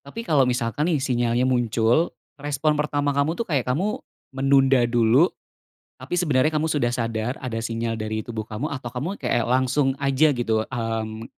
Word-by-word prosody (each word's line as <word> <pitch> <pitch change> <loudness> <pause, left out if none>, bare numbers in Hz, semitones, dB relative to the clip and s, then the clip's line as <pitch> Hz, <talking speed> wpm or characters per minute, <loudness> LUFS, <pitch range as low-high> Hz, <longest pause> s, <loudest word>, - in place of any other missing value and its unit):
Tapi 185 +12 -8
kalau 145 - +3
misalkan 120 +5 -1
nih, 170 - +2
sinyalnya 120 -3 0
muncul, 120 +4 +1 0.2
respon 145 +1 0
pertama 145 -1 0
kamu 140 +4 0
tuh 235 - -2
kayak 135 -7 -1
kamu 185 +12 -1 0.3
menunda 135 -1 +3
dulu, 120 +7 +4 0.7
tapi - - -9
sebenarnya 155 -4 +2
kamu 155 +1 0
sudah 140 -6 0
sadar 115 0 -2
ada 120 -4 -4
sinyal 115 0 -2
dari 110 0 -3
tubuh 110 -1 -5
kamu, 110 +7 -4
atau 130 -5 -6
kamu 145 +11 -4
kayak 120 - -1
langsung 130 +2 +1
aja 140 +1 +2
gitu? 110 -2 0
Mmm, 115 -2 -4
130 Hz, 165 wpm, -23 LUFS, 115-145 Hz, 0.7 s, dulu